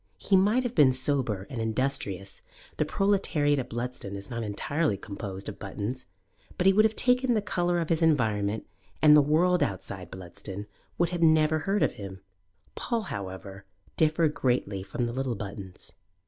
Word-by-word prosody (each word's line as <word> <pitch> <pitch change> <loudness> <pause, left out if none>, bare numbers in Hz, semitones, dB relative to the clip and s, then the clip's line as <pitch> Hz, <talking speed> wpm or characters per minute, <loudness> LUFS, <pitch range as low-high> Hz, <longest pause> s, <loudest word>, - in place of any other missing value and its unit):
He 190 - +1
might 210 +7 +4
have 245 -1 -3
been 140 - +5
sober 130 -7 +1
and 120 -4 -5
industrious 110 -5 -1 0.4
the - - +1
proletariat 170 -8 +1
of 125 -1 -4
Bludston 120 -4 -5
is 100 +2 -8
not 115 -1 -3
entirely 110 +4 -1
composed 100 -1 -7
of 105 - -7
Buttons 105 +6 -5 0.5
but 180 - 0
he 195 - +7
would 215 +2 +5
have 220 0 +1
taken 250 -1 +3
the - - +3
colour 175 -4 0
of 165 - -2
his 165 0 +1
environment, 110 -9 +1 0.3
and 150 -1 +7
the 150 - +8
world 170 +5 +3
outside 95 - -3
Bludston 95 +3 -7 0.3
would 175 0 0
never 155 -1 +4
have 145 - -8
heard 200 +1 +2
of - - +2
him. 95 -2 -9 0.5
Paul, 235 -2 -2
however, 95 0 -7 0.3
differed 155 0 +2
greatly 120 -8 0
from 100 +6 -3
the 120 - -3
little 130 -2 -2
Buttons. 100 -3 -8
130 Hz, 170 wpm, -28 LUFS, 100-165 Hz, 0.5 s, the